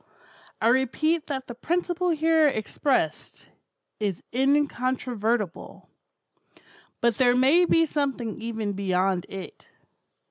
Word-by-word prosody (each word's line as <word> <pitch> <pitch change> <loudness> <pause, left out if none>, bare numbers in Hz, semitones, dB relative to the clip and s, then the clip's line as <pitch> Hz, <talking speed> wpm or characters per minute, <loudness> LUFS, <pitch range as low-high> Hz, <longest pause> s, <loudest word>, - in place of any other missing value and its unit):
I 225 - +3
repeat 295 +6 +1
that 265 -3 -4
the 240 - -8
principle 350 +7 -1
here 320 -1 +3
expressed, 235 - -2 0.5
is 200 -5 -3
incontrovertible; 250 - -1 1.1
but 235 -2 +2
there 245 -1 +4
may 290 +8 +5
be 330 -1 +3
something 270 -8 -3
even 220 -3 -3
beyond 190 -1 0
it. 195 -1 -9
255 Hz, 100 wpm, -25 LUFS, 215-295 Hz, 1.1 s, may